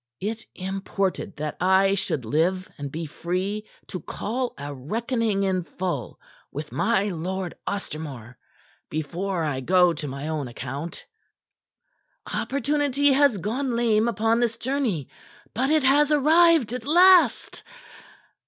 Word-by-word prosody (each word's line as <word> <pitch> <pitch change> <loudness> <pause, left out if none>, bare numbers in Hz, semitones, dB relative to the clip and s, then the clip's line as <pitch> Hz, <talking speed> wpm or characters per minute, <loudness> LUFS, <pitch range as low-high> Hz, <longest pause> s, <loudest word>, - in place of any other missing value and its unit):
It 225 +3 -4
imported 195 0 -3
that 150 0 -4
I 190 +1 +4
should 155 - -1
live 175 +9 +1
and 140 -1 -5
be 165 +3 -4
free 185 +7 -3 0.2
to 185 - -6
call 245 +9 -3
a 145 +1 -6
reckoning 220 - -1
in 190 -2 +1
full 180 +1 -4 0.3
with - - -6
my 210 -3 +1
Lord 185 +1 -3
Ostermore 145 - -5 0.5
before 170 +4 -2
I 145 -4 -1
go 180 +5 +4
to 150 - -5
my 140 +2 -5
own 155 -4 -2
account. 135 +7 -6 1.3
"Opportunity 285 0 +1
has 275 -5 +4
gone 235 +7 -2
lame 230 -1 +2
upon 225 0 +1
this 230 -2 0
journey. 235 - -1 0.5
But 255 +5 0
it 310 -2 +3
has 290 +3 +4
arrived 310 -3 +5
at 250 0 -5
last. 360 +3 +5
195 Hz, 125 wpm, -25 LUFS, 165-245 Hz, 1.3 s, arrived